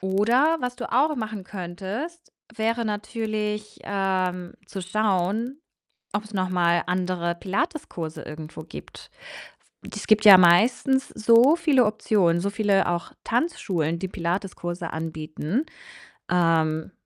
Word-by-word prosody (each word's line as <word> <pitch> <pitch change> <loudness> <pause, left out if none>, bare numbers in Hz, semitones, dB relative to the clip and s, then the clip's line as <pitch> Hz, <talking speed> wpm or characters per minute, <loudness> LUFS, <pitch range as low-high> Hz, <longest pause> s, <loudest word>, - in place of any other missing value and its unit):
Oder 235 +12 +2
was 250 0 -3
du 240 - -6
auch 290 +4 +3
machen 215 -4 -5
könntest, 200 - -6 0.2
wäre 230 +1 -1
natürlich, 210 0 -3
ähm, 185 -3 -1
zu 195 - -6
schauen, 215 - -1 0.5
ob's 210 +1 -4
noch 185 -1 -1
mal 175 -1 +2
andere 180 -1 -1
Pilates-Kurse 180 - -4
irgendwo 155 +1 -8
gibt. - - -11 0.8
Es 210 - -6
gibt 215 0 +4
ja 200 -3 +11
meistens 240 +10 +4
so 230 +6 +5
viele 285 -7 +3
Optionen, 195 -5 +1
so 200 - -1
viele 200 -3 +2
auch 175 -1 -3
Tanzschulen, 185 - -1
die 190 - -3
Pilates-Kurse 175 -1 -4
anbieten. 160 - -3 0.7
Ähm, 165 -1 +1
195 Hz, 115 wpm, -24 LUFS, 175-230 Hz, 0.8 s, ja